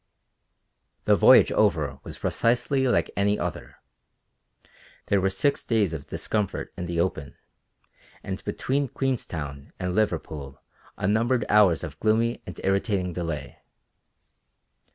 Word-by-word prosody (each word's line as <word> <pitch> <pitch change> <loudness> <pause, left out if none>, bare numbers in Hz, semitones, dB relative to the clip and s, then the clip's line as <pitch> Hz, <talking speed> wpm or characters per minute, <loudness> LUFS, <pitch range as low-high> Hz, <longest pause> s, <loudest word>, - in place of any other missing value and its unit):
The - - +5
voyage - - +7
over - - +1
was - - -8
precisely 125 +3 +1
like 125 - +1
any 100 +1 +2
other. - - -5 1.3
There 100 -1 +2
were 95 - +2
six 120 +9 0
days 105 -7 +1
of 75 -3 -6
discomfort 105 -3 -3
in 90 - -5
the 85 0 -2
open, 75 -5 -2 0.9
and 95 -1 -5
between 140 +2 -1
Queenstown 80 - -4
and 90 0 -2
Liverpool 80 -9 -2 0.4
unnumbered 110 +4 +1
hours 100 -6 +5
of - - -7
gloomy 115 +2 +1
and 90 - -8
irritating 95 -2 0
delay. 80 -5 -5
100 Hz, 115 wpm, -26 LUFS, 85-115 Hz, 1.3 s, voyage